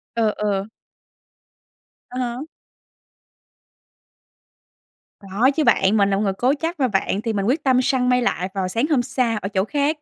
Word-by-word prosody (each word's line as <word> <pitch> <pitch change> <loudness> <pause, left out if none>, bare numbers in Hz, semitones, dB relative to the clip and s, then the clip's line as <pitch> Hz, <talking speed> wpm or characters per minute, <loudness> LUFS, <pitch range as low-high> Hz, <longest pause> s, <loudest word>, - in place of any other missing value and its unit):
Ừ, 225 -2 +2
ừ. 200 -2 -1 1.4
Ờ 250 - -8
ha. 245 +1 -3 2.8
Có 205 +7 +1
chứ 315 - +1
bạn. 195 -2 +3
Mình 200 -1 +3
là 195 - +1
một 200 - -1
người 195 -2 0
cố 250 +7 +1
chấp 330 0 -3
mà 260 - +2
bạn, 200 -1 -1
thì 225 -1 -2
mình 195 -1 -1
quyết 275 +8 0
tâm 260 -2 +3
săn 250 -1 +1
mây 250 0 +3
lại 185 -6 -1
vào 190 -2 -2
sáng 230 +8 0
hôm 280 -6 +3
sau 235 -2 -1
ở 195 - -3
chỗ 190 -2 0
khác. 290 +4 0
235 Hz, 175 wpm, -21 LUFS, 200-260 Hz, 2.8 s, bạn